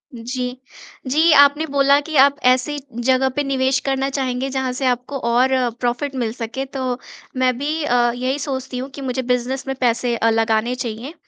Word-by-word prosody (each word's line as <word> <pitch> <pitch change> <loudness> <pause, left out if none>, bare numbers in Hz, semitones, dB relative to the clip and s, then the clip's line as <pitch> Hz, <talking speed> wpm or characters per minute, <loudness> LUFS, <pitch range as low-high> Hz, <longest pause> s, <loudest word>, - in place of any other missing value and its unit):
जी। 250 +2 -4 0.5
जी, 310 +5 +4
आपने 285 +2 +5
बोला 280 0 +4
कि 315 +1 -7
आप 280 +1 +6 0.2
ऐसी 260 +4 0 0.3
जगह 260 0 +3
पे 290 - 0
निवेश 270 -1 +1
करना 270 0 0
चाहेंगे 265 -1 -2
जहाँ 265 -1 -2
से 260 +1 -3
आपको 250 +3 -1
और 250 +3 +3 0.3
प्रॉफिट 245 +3 -2
मिल 235 -4 -1
सके 245 +2 -5
तो 260 -2 -3 0.4
मैं 255 -1 +2
भी 300 +4 -2
अ, 240 -3 +2
यही 255 +3 -2
सोचती 265 -2 -4
हूँ, 260 +2 -5
कि 280 - -10
मुझे 260 -1 -2
बिज़नेस 250 +2 -2
में 270 - -2
पैसे 240 0 +1
अ, 230 0 +2
लगाने 225 +1 +1
चाहिए 245 +4 -5
260 Hz, 180 wpm, -20 LUFS, 245-275 Hz, 0.5 s, आप